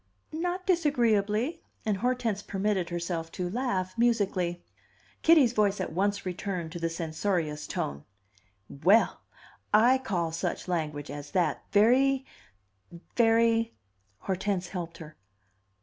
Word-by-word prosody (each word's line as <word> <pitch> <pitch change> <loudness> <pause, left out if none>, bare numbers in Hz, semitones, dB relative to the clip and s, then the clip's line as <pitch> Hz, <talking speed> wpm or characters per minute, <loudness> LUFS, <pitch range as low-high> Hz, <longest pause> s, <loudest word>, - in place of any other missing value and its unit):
"Not 355 +3 -2
disagreeably." 245 - +1 0.2
And 210 -3 +1
Hortense 240 -2 0
permitted 195 -3 -1
herself 170 -1 -3
to 180 - -3
laugh 195 -6 -1
musically. 195 -7 +1 0.6
Kitty's 305 -8 +5
voice 205 -3 +2
at 185 - -3
once 200 +3 0
returned 180 -2 -4
to 175 - -6
the 165 0 -1
censorious 160 -1 -2
tone. 70 0 -4 0.6
"Well, 190 +11 +3 0.5
I 240 +5 +5
call 175 -10 -2
such 165 +3 -3
language 155 -4 -3
as 145 0 -7
that 180 -2 +1
very 260 +6 +4 0.9
very 230 0 +3 0.2
" 95 0 -42
Hortense 190 -1 -2
helped 170 -3 -5
her. 155 -2 -11
200 Hz, 120 wpm, -28 LUFS, 170-230 Hz, 0.9 s, Kitty's